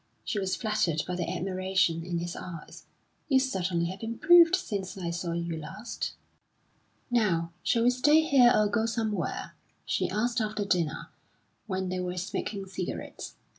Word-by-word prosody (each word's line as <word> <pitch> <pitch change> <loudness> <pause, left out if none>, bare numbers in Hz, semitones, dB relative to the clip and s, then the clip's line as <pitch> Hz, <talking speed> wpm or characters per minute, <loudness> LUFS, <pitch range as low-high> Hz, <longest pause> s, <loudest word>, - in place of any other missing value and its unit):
She 210 - -2
was 190 -1 -1
flattered 210 -9 0
by 180 - -2
the 175 -1 -2
admiration 185 -3 0
in 175 0 -3
his 170 0 -4
eyes. 170 -4 -9 0.4
"You 265 -2 +5
certainly 185 -9 0
have 190 - -9
improved 335 +10 +6
since 200 - -4
I 175 -3 -3
saw 170 0 -3
you 170 -1 -2
last." 190 +9 -5 1.0
"Now, 175 -8 +2
shall 230 - +2
we 245 - +5
stay 295 +5 +5
here 265 -6 +6
or 210 - +4
go 220 +2 +1
somewhere?" 220 -6 -2 0.3
she - - 0
asked 235 +5 0
after 215 -1 -2
dinner, 175 -6 -1 0.6
when 190 -2 -2
they 185 0 -2
were 180 0 -3
smoking 195 +2 -3
cigarettes. 190 -1 -6
190 Hz, 155 wpm, -28 LUFS, 175-230 Hz, 1.0 s, improved